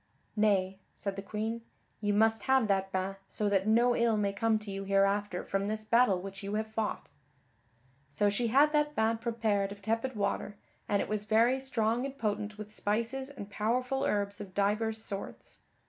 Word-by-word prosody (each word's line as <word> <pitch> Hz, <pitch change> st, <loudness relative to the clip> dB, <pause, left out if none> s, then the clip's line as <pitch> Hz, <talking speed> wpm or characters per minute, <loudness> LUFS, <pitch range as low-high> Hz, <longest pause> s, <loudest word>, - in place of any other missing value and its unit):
"Nay," 195 Hz, -3 st, +2 dB, 0.2 s
said 200 Hz, -1 st, -3 dB
the 195 Hz, -, -4 dB
Queen, 220 Hz, +3 st, -3 dB, 0.4 s
"you 205 Hz, -1 st, +1 dB
must 220 Hz, +1 st, +3 dB
have 265 Hz, -4 st, +4 dB
that 195 Hz, -1 st, +1 dB
bain 190 Hz, +1 st, -2 dB
so 210 Hz, -, -1 dB
that 195 Hz, 0 st, +1 dB
no 235 Hz, +2 st, +4 dB
ill 230 Hz, -2 st, +2 dB
may 200 Hz, -1 st, 0 dB
come 220 Hz, +2 st, +2 dB
to 210 Hz, -1 st, -7 dB
you 195 Hz, 0 st, -4 dB
hereafter 195 Hz, -1 st, +1 dB
from 195 Hz, 0 st, -1 dB
this 215 Hz, +1 st, -2 dB
battle 230 Hz, -4 st, +4 dB
which 195 Hz, +2 st, -8 dB
you 200 Hz, +1 st, -3 dB
have 215 Hz, +1 st, 0 dB
fought." 220 Hz, -1 st, -3 dB, 1.0 s
So 150 Hz, +9 st, +1 dB
she 205 Hz, +4 st, +1 dB
had 285 Hz, +6 st, +4 dB
that 295 Hz, 0 st, +1 dB
bain 225 Hz, +1 st, +1 dB
prepared 220 Hz, -4 st, 0 dB
of 200 Hz, -, -8 dB
tepid 225 Hz, +5 st, -1 dB
water, 200 Hz, 0 st, -2 dB, 0.3 s
and 200 Hz, -1 st, +2 dB
it -, -, -7 dB
was 210 Hz, -1 st, -2 dB
very 230 Hz, +5 st, +3 dB
strong 240 Hz, -3 st, 0 dB
and 275 Hz, 0 st, -5 dB
potent 210 Hz, -2 st, -2 dB
with 210 Hz, 0 st, -8 dB
spices 230 Hz, +7 st, -1 dB
and 250 Hz, -8 st, -8 dB
powerful 250 Hz, +6 st, 0 dB
herbs 200 Hz, 0 st, 0 dB
of 190 Hz, -3 st, -9 dB
divers 215 Hz, +2 st, +1 dB
sorts. 195 Hz, -1 st, -6 dB
215 Hz, 185 wpm, -31 LUFS, 200-230 Hz, 1.0 s, have